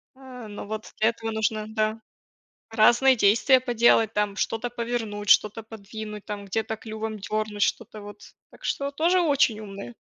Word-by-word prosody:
а, 255 -3 -11
но 205 -1 -8
вот 215 +1 -6
для 220 - +4
этого 225 -1 -5
нужно, 220 0 -1
да, 215 0 -1 0.7
разные 240 +4 +5
действия 235 +5 +4
поделать, 235 -3 +3
там, 210 -1 -1
что-то 225 +4 -2
повернуть, 230 -4 -4
что-то 215 +3 +4
подвинуть, 215 -1 -9
там, 205 -1 -6
где-то 220 +3 -3
клювом 220 0 -6
дернуть, 210 0 -3
что-то 215 -2 -1
вот. 205 0 -11 0.3
Так - - -18
что 280 0 -1
тоже 340 +5 +2
очень 280 -9 +2
умные. 200 +2 -9
220 Hz, 155 wpm, -25 LUFS, 210-235 Hz, 0.7 s, разные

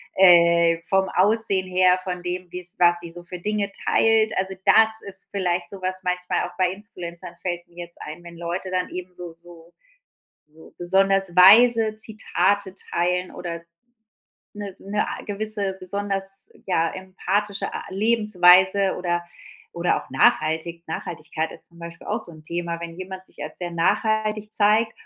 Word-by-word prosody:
äh, 170 -2 +6
vom 190 0 +2
Aussehen 200 -1 +2
her, 185 0 +3
von 180 -1 -4
dem, 180 +1 -4
wie's 180 0 -3
was 175 -1 +5
sie 170 -1 -5
so 175 +1 -9
für 180 0 -7
Dinge 205 +1 -2
teilt. 220 -1 +3
Also, 190 0 -1
das 220 0 +6 0.2
ist 195 -1 -5
vielleicht 180 -3 -1
so 195 -1 -9
was 185 0 -1
manchmal 180 0 -1
auch - - -15
bei 185 -1 +2
Influencern 180 -3 -8
fällt 175 -1 -4
mir 175 0 -9
jetzt 170 - -23
ein, 155 +3 -8
wenn 170 -1 -12
Leute 175 +2 -4
dann 180 0 -1
eben 180 0 -7
so 175 -2 -9
so 170 0 -17 0.8
so 160 +1 -18
besonders 195 0 +2
weise 220 +3 +7
Zitate 205 -3 -1
teilen 180 0 -1
oder 170 -1 -6 0.9
'ne 205 -2 -7
'ne 205 +2 -2
a - - -6
gewisse 205 -2 -1
besonders, 195 0 -3 0.2
ja, 165 -3 +1
empathische 195 +2 -3
a - - -5
Lebensweise 195 -2 +4
oder 175 -1 -1 0.5
oder 170 +1 0
auch - - -20
nachhaltig 160 +5 +1
Nachhaltigkeit 160 -1 -4
ist - - -14
zum 170 - -20
Beispiel 170 0 -10
auch 215 - 0
so 180 -6 -8
'n 155 -1 -14
Thema, 170 +1 -4
wenn 170 0 -7
jemand 185 0 -8
sich - - -16
als - - -9
sehr 175 -1 -4
nachhaltig 215 +4 0
zeigt 220 +1 +3
185 Hz, 160 wpm, -23 LUFS, 175-200 Hz, 0.9 s, weise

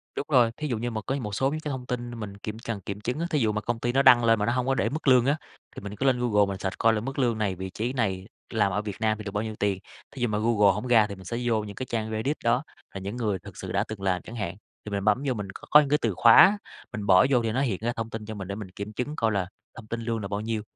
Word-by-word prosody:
Đúng - - -3
rồi, 125 -6 +5
thí 150 - -3
dụ 120 -5 -1
như 120 +2 -3
mà 110 -1 -3
cái 135 +1 -1
một 105 -5 -4
số 135 +6 +2
những 155 - -3
cái 155 - -5
thông 130 -2 -5
tin 120 -1 -4
mình 100 -2 -6
kiểm 110 +2 -6
cần 115 -3 -5
kiểm 100 +2 -6
chứng 125 +7 -2
á, 170 - -1
thí 155 - +1
dụ 110 -4 +2
mà 105 0 -2
công 120 +1 -2
ty 120 +1 0
nó 135 +2 +3
đăng 125 -3 +7
lên 115 -1 +4
mà 105 - +1
nó 120 - +1
hông 125 0 0
có 135 - +2
để - - +1
mức 155 +1 -5
lương 125 -2 +6
á, 140 +3 +2 0.4
thì - - -7
mình 100 +1 -7
cứ 135 - -2
lên 130 -2 +3
Google 105 -4 +3
mình 100 -1 -4
search 95 0 -4
coi 115 0 +4
là 105 - -1
mức 135 +4 -5
lương 120 -4 +2
này, 105 -3 -1
vị 95 +1 -5
trí 115 +6 -3
này, 95 -7 -1 0.2
làm 105 -3 +1
ở 105 +2 0
Việt 105 -2 -5
Nam 110 -1 +1
thì 110 - -7
được 100 - -5
bao 105 +1 -1
nhiêu 110 -1 -5
tiền. 100 -2 0 0.3
Thí 135 - -9
dụ 120 - +2
mà 105 -2 -1
Google 105 -2 +4
hổng 105 +5 -4
ra 115 -3 +5
thì 100 - -7
mình 95 -1 -13
sẽ 115 - -3
vô 115 -3 +1
những 100 -1 -8
cái 130 - -4
trang 110 -3 -3
Reddit 120 +8 -1
đó, 120 +4 +2 0.3
là 95 - -5
những 100 +4 -5
người 105 -6 -1
thực - - -12
sự - - -6
đã - - +1
từng 110 -2 -7
làm 95 -2 0
chẳng 115 - -10
hạn, 95 -6 -3 0.3
thì 105 - -6
mình 100 -1 -2
bấm 110 +6 +3
vô 130 - +2
mình 105 -4 -5
c - - -11
có 150 - +10
những 145 -2 +1
cái 150 +1 +3
từ 115 -4 +1
khóa, 120 - +7 0.4
mình 105 -1 -4
bỏ 95 +2 +6
vô 125 -3 +3
thì 115 - 0
nó 130 +4 0
hiện 115 -9 0
ra 120 +2 -1
thông 115 0 -4
tin 110 -1 -6
cho 110 0 -6
mình 95 -2 -6
để 100 - -4
mình 105 -3 -7
kiểm 100 +3 -7
chứng 125 +7 -3
coi 115 -5 +1
là 100 -3 0 0.3
thông 110 - -11
tin 115 +1 -4
lương 115 0 -2
là 100 - -4
bao 100 +1 -3
nhiêu, 110 0 -2
110 Hz, 340 wpm, -26 LUFS, 105-125 Hz, 0.4 s, có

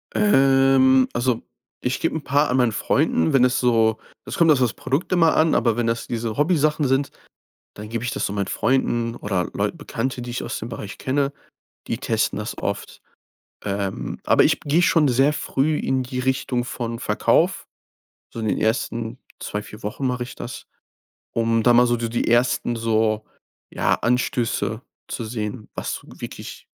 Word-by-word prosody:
Ähm, 135 -6 +5
also 120 -1 0 0.4
ich 125 +1 -1
gebe 165 - -1
'n 160 - -3
paar 145 +3 +2
an 125 - +1
meinen 125 -3 +3
Freunden, 80 -5 +1
wenn 135 -2 +5
es 125 0 +3
so 115 -3 +3 0.3
es - - -5
kommt 165 -2 +5
auf 145 - +4
das 125 -3 +2
Produkt 140 +8 -2
immer 165 -3 +4
an, 155 0 +4
aber 115 -2 +2
wenn 120 -1 0
das 115 0 -1
diese 115 -2 -3
Hobbysachen 150 -1 +2
sind, 135 +2 +1 0.6
dann 105 +1 -8
gebe 115 0 -3
ich 120 - -2
das - - -1
so 100 - -3
meinen 100 -1 -1
Freunden 120 -3 0
oder 95 -6 -2
Leut - - -1
Bekannte, 125 +2 -3
die 120 0 -6
ich 120 - -3
aus 120 - -4
dem 115 - -6
Bereich 105 -3 -7
kenne, 140 +1 0 0.6
die - - -2
testen - - 0
das - - -5
oft. - - -4 0.6
Ähm, 100 -10 -3
aber - - +5
ich - - +2
gehe 155 +4 +2
schon 155 -3 +4
sehr 135 +4 +3
früh 150 +1 0
in 130 -1 0
die 125 0 -5
Richtung 125 -1 0
von 115 -1 -4
Verkauf. - - +1 0.7
So - - -6
in 110 - -2
den - - 0
ersten 115 +1 -1 0.2
2, 105 - -4
4 105 +1 -12
Wochen 105 +6 -4
mache 125 -1 -1
ich 125 - -10
das, - - -8 0.7
um 115 0 +2
da 120 - +5
mal 125 +1 +6
so 120 0 +1
so 115 0 -2
die 120 +1 -1
ersten 120 0 +2
so, 110 -1 +1 0.5
ja, - - +1
Anstöße 120 -2 0 0.3
zu 120 - -4
sehen, 110 0 -5
was - - -4
wirklich - - -9
120 Hz, 180 wpm, -22 LUFS, 115-135 Hz, 0.7 s, mal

